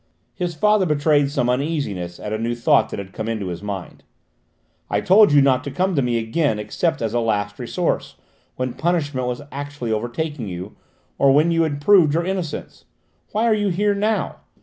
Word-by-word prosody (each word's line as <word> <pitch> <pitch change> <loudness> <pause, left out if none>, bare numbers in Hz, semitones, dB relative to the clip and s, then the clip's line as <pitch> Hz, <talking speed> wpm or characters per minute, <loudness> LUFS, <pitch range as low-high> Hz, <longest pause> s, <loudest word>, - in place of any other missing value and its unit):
His 175 -2 -3
father 210 +2 +3
betrayed 145 -1 +2
some 135 -4 0
uneasiness 125 - -2
at 105 - -5
a 110 - -2
new 120 +1 -1
thought 135 +4 +3
that - - -5
had 95 -1 -8
come 110 - -4
into 105 -5 -3
his 85 0 -6
mind. 100 -3 -6 0.9
"I - - +1
told 205 0 +6
you 145 -1 +6
not 130 -1 +3
to - - -3
come 185 +8 0
to 145 - +2
me 120 -2 0
again 115 +2 0
except 130 +9 -1
as 110 -1 -2
a 120 - +2
last 105 -3 -1
resource, - - -2 0.4
when 130 -1 -3
punishment 145 -7 -1
was 125 +3 -4
actually 145 -4 -5
overtaking 120 +4 -3
you, 90 +2 -7 0.4
or 140 -1 +5
when 150 +5 +4
you 165 0 +2
had 145 -3 -1
proved 160 -3 +5
your 170 +1 0
innocence: 185 -5 -4 0.5
why 220 +2 +1
are 230 - +4
you 205 -1 0
here 205 +3 +1
now? 210 +2 -1
140 Hz, 195 wpm, -21 LUFS, 115-165 Hz, 0.9 s, told